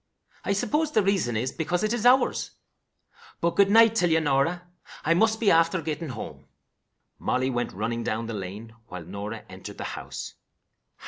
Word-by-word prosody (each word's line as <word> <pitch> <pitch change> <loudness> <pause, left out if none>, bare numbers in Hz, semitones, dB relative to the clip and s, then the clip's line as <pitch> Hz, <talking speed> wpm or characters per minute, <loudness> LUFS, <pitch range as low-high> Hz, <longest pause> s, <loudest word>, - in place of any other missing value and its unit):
I 200 - 0
suppose 295 +9 0
the 215 -8 +3
reason 190 - +1
is 125 +4 -1
because 175 +3 -1
it 215 +2 +1
is 240 0 +2
ours. 255 +2 +3 0.8
But, 170 0 0
good 200 -1 +5
night 225 +1 +7
till 180 -6 +2
ye, 160 0 +4
Norah. 155 +4 +1 0.4
I 165 - +4
must 220 +5 +2
be 220 - +4
after 165 +2 +3
getting 155 0 -4
home." 115 -4 -8 0.7
Molly 130 +1 0
went 120 -1 -2
running 115 +4 -3
down 110 +2 -2
the 115 - -5
lane, 105 +3 -7
while 90 -1 -7
Norah 100 +5 -6
entered 95 0 -10
the - - -5
house. - - -7
160 Hz, 175 wpm, -26 LUFS, -, 0.8 s, night